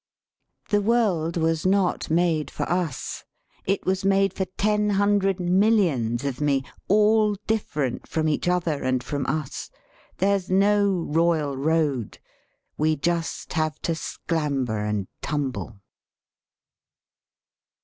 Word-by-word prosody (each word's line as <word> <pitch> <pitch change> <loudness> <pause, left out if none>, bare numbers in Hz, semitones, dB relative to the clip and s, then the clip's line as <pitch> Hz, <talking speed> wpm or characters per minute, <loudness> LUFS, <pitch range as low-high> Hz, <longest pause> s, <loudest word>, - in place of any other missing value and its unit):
"The 205 -1 +3
world 195 -7 +1
was 160 -1 +1
not 190 -1 +1
made 160 -2 +1
for - - -4
us; 175 -5 -2 0.4
it 195 +1 -1
was 190 +1 0
made 195 -1 +3
for 190 - -2
ten 210 0 +2
hundred 200 -1 +2
millions 175 - +2
of 140 -1 -3
me, 140 -2 +2 0.2
all 210 +1 +4
different 150 - -2
from 155 -1 -1
each 155 +2 0
other 175 -4 0
and 130 -1 0
from 140 +1 -3
us; 155 -3 -3 0.5
there's 195 -1 +1
no 200 +2 +3 0.2
royal 160 -3 +1
road, 145 -5 0 0.6
we 155 +1 +2
just 170 +2 -2
have 155 -1 -1
to - - 0
sclamber 140 -8 -2
and 100 -3 -2
tumble." 135 -7 -3
165 Hz, 120 wpm, -24 LUFS, 145-195 Hz, 0.6 s, all